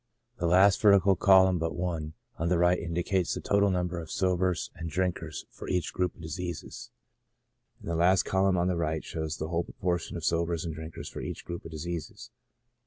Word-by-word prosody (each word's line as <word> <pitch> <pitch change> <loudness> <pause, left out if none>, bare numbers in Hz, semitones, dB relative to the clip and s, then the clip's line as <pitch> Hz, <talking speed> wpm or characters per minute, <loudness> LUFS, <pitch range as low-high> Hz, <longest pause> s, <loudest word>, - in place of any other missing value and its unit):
The 85 - +1
last 95 +3 +5
vertical 100 -2 +6
column 95 -2 +5
but 80 0 -2
one 85 -3 -3 0.3
on 85 +1 0
the, 90 - +3
right 90 +1 +3
indicates 85 +2 -1
the - - -3
total 100 0 +2
number 90 -1 -1
of 80 -2 -8
sobers 90 0 0
and 85 - -6
drinkers 90 +2 -2
for - - -9
each 90 -3 -1
group 90 -1 -1
of - - -14
diseases 85 +1 -6 0.9
j - - -34
and - - -11
the 85 - -1
last 90 +3 +4
column 95 0 +2
on 90 +1 +1
the 90 - +1
right 80 -1 -1
shows 80 -1 -4
the 80 - -4
whole 85 0 0
proportion 90 -2 -3
of 80 - -5
sobers 85 0 0
and 80 - -3
drinkers 80 +1 -8
for - - -7
each - - -6
group 85 0 -6
of - - -7
diseases. 85 0 -6
85 Hz, 200 wpm, -29 LUFS, 80-90 Hz, 0.9 s, vertical